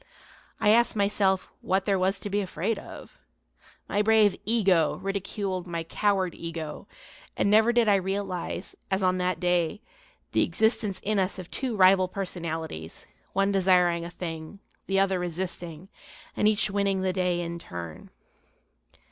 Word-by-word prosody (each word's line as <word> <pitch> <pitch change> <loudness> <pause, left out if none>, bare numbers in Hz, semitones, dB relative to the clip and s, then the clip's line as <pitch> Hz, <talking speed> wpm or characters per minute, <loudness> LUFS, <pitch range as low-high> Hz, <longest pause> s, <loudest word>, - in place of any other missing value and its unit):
I 210 - +3
asked 235 +2 +4
myself 200 -2 +1
what 190 +1 0
there 195 -2 +2
was 190 +2 +2
to 205 - -4
be 205 +1 +1
afraid 195 +3 -2
of. - - -12 0.7
My 205 - +1
brave 215 -2 +5
"ego" 195 -8 +3
ridiculed 195 -1 -3
my 170 -1 -3
coward 190 0 0
"ego," 165 -2 -6 0.5
and 200 - +2
never 220 +2 +5
did 240 -2 +3
I 205 -1 +5
realize, 190 -1 -3 0.2
as 190 0 0
on 185 0 +2
that 180 -2 0
day, 175 +1 +1 0.5
the - - +2
existence 220 -3 +1
in 210 0 +1
us 190 +1 0
of 185 -2 -9
two 255 -4 -3
rival 185 -1 +5
personalities, 165 - -5 0.3
one 195 +1 +2
desiring 180 -3 +3
a 170 - -6
thing, 165 0 -7 0.3
the 195 0 +2
other 195 -1 +2
resisting, 175 -1 -5 0.5
and 210 - +2
each 215 -1 +2
winning 200 -1 +1
the 185 -1 0
day 180 -2 0
in 170 0 -4
turn. 85 - -8
190 Hz, 150 wpm, -27 LUFS, 175-200 Hz, 0.7 s, brave